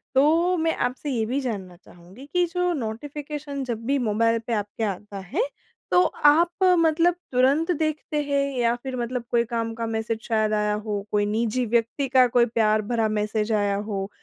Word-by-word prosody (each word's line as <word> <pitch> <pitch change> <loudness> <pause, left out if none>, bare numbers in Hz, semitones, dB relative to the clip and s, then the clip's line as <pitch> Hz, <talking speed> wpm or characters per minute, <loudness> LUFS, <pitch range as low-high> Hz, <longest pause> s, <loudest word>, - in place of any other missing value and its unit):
तो 330 +6 +4
मैं 325 0 +1
आपसे 260 +4 -6
ये 230 -4 0
भी 255 +5 -1
जानना 200 -8 -5
चाहूँगी 180 +7 -15
कि 355 0 +3
जो 360 0 +1
नोटिफ़िकेशन 285 +3 -5
जब 230 -3 -5
भी 280 +3 +1
मोबाइल 230 +2 +2
पे 235 - -1
आपके 205 +1 -3
आता 200 0 -4
है 390 - +2 0.5
तो 360 - +6
आप 315 +4 +4 0.3
मतलब 330 +2 +3 0.2
तुरंत 275 +7 +3
देखते 310 -1 -2
हैं? 280 -1 +1 0.2
या 235 -1 +2
फ़िर 255 +2 -6
मतलब 245 0 -3
कोई 235 -1 +3
काम 230 -1 -3
का 230 0 -3
मैसेज 220 0 -2
शायद 215 -2 0
आया 210 0 +1
हो? 210 -1 -3
कोई 205 0 +2
निजी 230 +3 0
व्यक्ति 235 +5 0
का 255 -1 +5
कोई 240 0 +3
प्यार 215 -2 +2
भरा 225 +1 0
मैसेज 215 +1 -1
आया 205 -2 +1
हो? 200 -1 -3
235 Hz, 180 wpm, -24 LUFS, 215-280 Hz, 0.5 s, तो